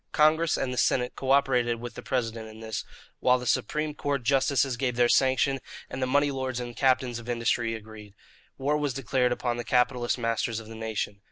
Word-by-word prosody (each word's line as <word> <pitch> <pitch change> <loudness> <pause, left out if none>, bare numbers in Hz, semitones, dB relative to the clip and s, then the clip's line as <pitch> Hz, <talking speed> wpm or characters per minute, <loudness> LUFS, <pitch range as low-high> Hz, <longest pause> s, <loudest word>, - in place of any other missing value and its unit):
Congress 160 +1 +4
and 125 -1 -2
the 125 - -1
Senate 125 -1 +2
co 135 - -5
operated 125 -4 +3
with 120 0 -7
the - - -8
President 115 -4 -2
in 110 0 -12
this, 110 0 -4 0.4
while 125 0 +4
the 125 - -7
Supreme 150 +4 0
Court 145 -3 -2
justices 135 0 +2
gave 125 -1 -1
their 120 0 +4
sanction 135 +2 +3 0.3
and 130 - -5
the 130 - +1
money 145 +2 +3
lords 130 -2 -3
and 120 0 -5
the - - -17
captains 130 -1 +2
of 120 +1 -10
industry 115 -1 0
agreed. 105 -2 -11 0.4
War 145 +3 +1
was 145 -4 -1
declared 125 -1 +1
upon 120 -1 -1
the 120 - -3
capitalist 125 +1 +1
masters 115 -1 -1
of 115 - -10
the 115 - -9
nation. 110 -2 -4
125 Hz, 205 wpm, -27 LUFS, 115-135 Hz, 0.4 s, Congress